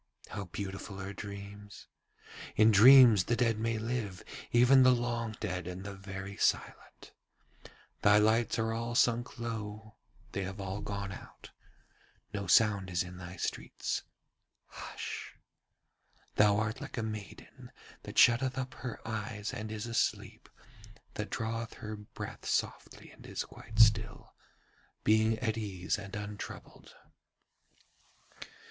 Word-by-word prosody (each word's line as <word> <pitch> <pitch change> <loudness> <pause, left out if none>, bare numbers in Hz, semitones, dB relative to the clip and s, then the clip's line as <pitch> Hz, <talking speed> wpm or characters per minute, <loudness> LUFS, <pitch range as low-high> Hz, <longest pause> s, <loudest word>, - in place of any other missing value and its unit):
How 100 - -5
beautiful 95 +1 -6
are 100 +1 -5
dreams! 100 0 -9 0.7
In 110 +1 +6
dreams 115 -2 +8
the 120 - +1
dead 115 -3 +1
may 115 0 0
live, 110 -4 -3 0.3
even 125 +3 +6
the 130 - +7
long 120 -2 -2
dead 90 -4 -3
and 90 +1 -6
the 100 0 -6
very 95 0 -7
silent. - - -1 0.9
Thy 105 0 +6
lights 110 +2 +3
are 115 0 0
all 115 +1 -3
sunk 120 0 +2
low, 110 -2 -6 0.3
they 100 - -3
have 95 +1 -5
all 95 +1 -4
gone 100 -1 -4
out, - - -12 0.8
no 100 -2 -3
sound 100 -1 +4
is 90 +1 0
in 90 0 -10
thy 90 0 -8
streets. - - -3 0.6
Hush! - - -7 1.0
Thou 105 -1 +4
art 110 +1 -2
like - - -7
a 115 - -1
maiden 110 -4 -8 0.3
that - - -9
shutteth 130 +2 +5
up 130 -1 -3
her 120 -3 -7
eyes 105 -1 -4
and 110 0 -5
is 110 0 -4
asleep, 115 -1 -2 0.6
that - - -4
draweth 115 0 -3
her 110 0 -6
breath 105 0 -8
softly - - -2
and - - -14
is - - -3
quite 110 - -12
still, 110 0 +3 0.7
being 110 +1 +3
at 110 0 -1
ease 95 -2 -2
and 100 +1 -8
untroubled. 105 -1 -8
110 Hz, 130 wpm, -32 LUFS, 100-115 Hz, 1.0 s, dreams